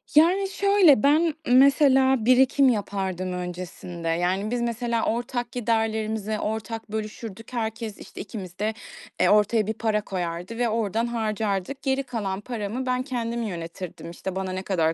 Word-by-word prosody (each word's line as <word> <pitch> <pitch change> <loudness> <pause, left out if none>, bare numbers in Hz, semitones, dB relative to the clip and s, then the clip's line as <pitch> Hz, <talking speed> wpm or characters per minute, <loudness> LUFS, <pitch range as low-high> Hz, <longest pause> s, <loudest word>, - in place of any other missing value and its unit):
Yani, 370 +5 +5
şöyle, 390 - +5
ben 310 +3 +4
mesela 265 -1 +5
birikim 260 +2 +5
yapardım 190 -4 -2
öncesinde. 180 -1 -6
Yani, 180 +6 0
biz 245 - 0
mesela 235 0 -1
ortak 240 +1 -2
giderlerimizi 220 -2 -1
ortak 220 0 -4
bölüşürdük. 220 +1 -6
Herkes 225 -2 -3
işte, - - -9
ikimiz 190 -3 -8
de, 215 +1 0 0.5
eee, - - +4
ortaya 210 +1 +3
bir 220 - 0
para 220 -1 0
koyardı 180 +2 -4
ve 240 -1 +1
oradan 225 +1 0
harcardık. 215 +1 -2
Geri 270 0 0
kalan 205 -7 -3
paramı 230 +2 -4
ben 255 0 0
kendim 235 -3 -3
yönetirdim, 170 -3 -6
işte, 185 +2 -6
bana 190 -1 -2
ne 185 - -3
kadar 165 -5 +1
220 Hz, 145 wpm, -25 LUFS, 195-245 Hz, 0.5 s, Yani